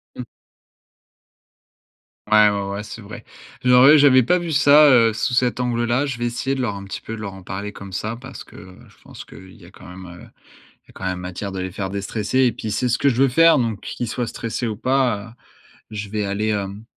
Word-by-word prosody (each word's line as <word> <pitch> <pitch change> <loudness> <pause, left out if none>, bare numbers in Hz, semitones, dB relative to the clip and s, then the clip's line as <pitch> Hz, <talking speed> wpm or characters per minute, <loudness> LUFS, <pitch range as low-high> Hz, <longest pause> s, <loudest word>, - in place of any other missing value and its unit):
Mmh. - - -6 2.1
Ouais, 105 -1 +6
ouais, 100 -1 -2
ouais, 100 +1 -5
c'est 115 - -10
vrai. 105 +1 -11 0.4
J'aurais 125 +4 +7
j'avais 130 -3 +5
pas 180 +9 +2
vu 170 -2 -4
ça, 145 +1 +6
heu, 115 -4 +5
sous 110 +3 -2
cet 125 0 +1
angle 120 -1 -1
là. 120 +4 0
Je 135 -4 -4
vais 120 - -3
essayer 120 +3 -2
de 130 - -3
leur 105 -5 -2
un 100 0 -8
petit 100 - -7
peu 115 - -7
de 110 - -9
leur 100 -2 -6
en 95 - -12
parler 100 +3 -6
comme 100 -1 -10
ça 110 +4 -4
parce 130 +3 -11
que, - - -18
heu, 95 -1 -14
je - - -22
pense - - -12
qu'il 95 0 -14
y 100 -6 -17
a 90 - -16
quand 100 - -16
même, 90 +1 -11
heu, 90 0 -12 0.7
il - - -39
y - - -18
a - - -17
quand 95 - -7
même 90 -1 -2
matière 90 +2 -6
de 95 -1 -5
les 95 -1 -5
faire 95 0 -4
déstresser. 105 +4 -2
Et 125 -3 +3
puis 110 - -6
c'est 125 +4 -1
ce 120 - +1
que 140 - +2
je 130 +1 +1
veux 135 - +4
faire 165 +5 +5
donc 115 -4 -2
qu'ils 120 - -5
soient 120 +2 -3
stressés 115 +1 -4
ou 110 -2 -4
pas, 120 -3 -1 0.6
je 105 -2 -6
vais 105 -1 -2
aller 100 +2 -2
hem, 100 0 -3
110 Hz, 245 wpm, -21 LUFS, 100-125 Hz, 2.1 s, J'aurais